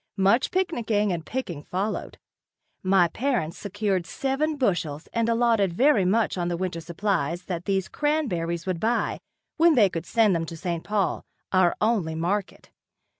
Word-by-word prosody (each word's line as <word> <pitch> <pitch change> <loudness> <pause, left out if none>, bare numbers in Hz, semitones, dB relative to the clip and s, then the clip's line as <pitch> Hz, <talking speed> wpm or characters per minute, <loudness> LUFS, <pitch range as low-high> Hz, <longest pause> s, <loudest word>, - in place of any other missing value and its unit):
Much 200 +7 +3
picnicking 230 - 0
and 165 -2 -5
picking 185 - -4
followed. 190 +7 -3 0.6
My 185 -2 +4
parents 235 - -2
secured 200 -3 -1
seven 275 - -1
bushel 175 - 0
and 230 0 +1
alloted 230 -5 +2
very 240 - +4
much 210 0 +1
on 175 - -1
the 175 -1 -1
winter 180 -2 -3
supplies 170 -1 -1
that 175 -1 -5
these 195 -2 0
cranberries 180 - -1
would 185 -3 -2
buy 230 +5 0 0.4
when 330 0 +5
they 210 -6 +5
could 170 -1 -5
send 220 -5 +3
them 165 -1 -2
to 165 - -7
St. 170 -1 -3
Paul, 205 -4 -1 0.3
our 185 -2 +3
only 210 -8 +1
market. 185 +5 -3
195 Hz, 155 wpm, -25 LUFS, 170-230 Hz, 0.6 s, when